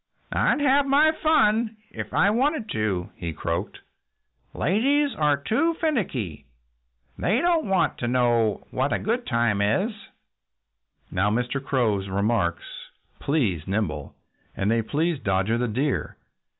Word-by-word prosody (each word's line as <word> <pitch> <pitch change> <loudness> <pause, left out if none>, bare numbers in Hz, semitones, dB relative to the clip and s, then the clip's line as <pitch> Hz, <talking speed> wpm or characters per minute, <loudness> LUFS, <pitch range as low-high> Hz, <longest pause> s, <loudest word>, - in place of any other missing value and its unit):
"I'd - - +2
have 280 0 +3
my 295 +3 +5
fun 225 -9 +2
if - - -6
I 200 - +3
wanted 255 0 0
to," 100 -5 -2
he 85 -2 -4
croaked. 85 +5 -4 0.7
"Ladies 275 - +1
are 150 -4 +2
too 230 - 0
finicky. 135 - -2 0.7
They 210 +7 +2
don't 335 -5 +1 0.4
know 120 -4 +2
what 130 +2 0
a - - +2
good 235 +4 -2
time 115 -5 +1
is." 110 - +1 1.2
Now, 100 +3 +1
Mr. 125 +5 -1
Crow's 110 -8 0
remarks 100 -3 0 0.6
pleased 110 - 0
Nimble. 95 -8 -2 0.4
And 100 +2 +1
they 115 0 +2
pleased 150 +4 -1
Dodger 95 +4 +1
the 125 - 0
Deer. 130 +6 -2
130 Hz, 125 wpm, -25 LUFS, -, 1.2 s, my